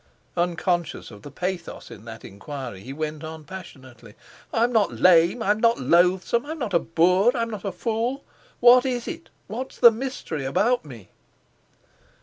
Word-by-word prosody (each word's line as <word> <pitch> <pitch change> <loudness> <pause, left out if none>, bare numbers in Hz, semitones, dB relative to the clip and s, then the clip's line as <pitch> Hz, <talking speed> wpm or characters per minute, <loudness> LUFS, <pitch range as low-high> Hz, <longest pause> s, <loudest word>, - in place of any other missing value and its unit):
Unconscious 175 -2 -1
of 105 -1 -13
the 145 - -10
pathos 180 +1 -5
in 110 -1 -12
that 115 -1 -10
enquiry, 120 0 -8
he 130 - -9
went 155 +1 -5
on 160 0 -8
passionately: 130 - -12 0.4
"I'm 235 +2 +1
not 215 -3 +2
lame, 175 +5 +4
I'm 210 +1 +1
not 230 +1 +3
loathsome, 180 - +2
I'm 315 +3 -6
not 235 -9 -4
a 170 - +5
boor, 180 +9 +2
I'm 230 0 -2
not 210 -4 -6
a 195 - -1
fool. 235 +6 -2 0.4
What 245 +1 +7
is 250 -3 -2
it? 335 -2 -7 0.2
What's 245 +6 -6
the 235 - +8
mystery 225 - -5
about 220 - +1
me?" 120 -10 -12
180 Hz, 160 wpm, -24 LUFS, 145-235 Hz, 0.4 s, the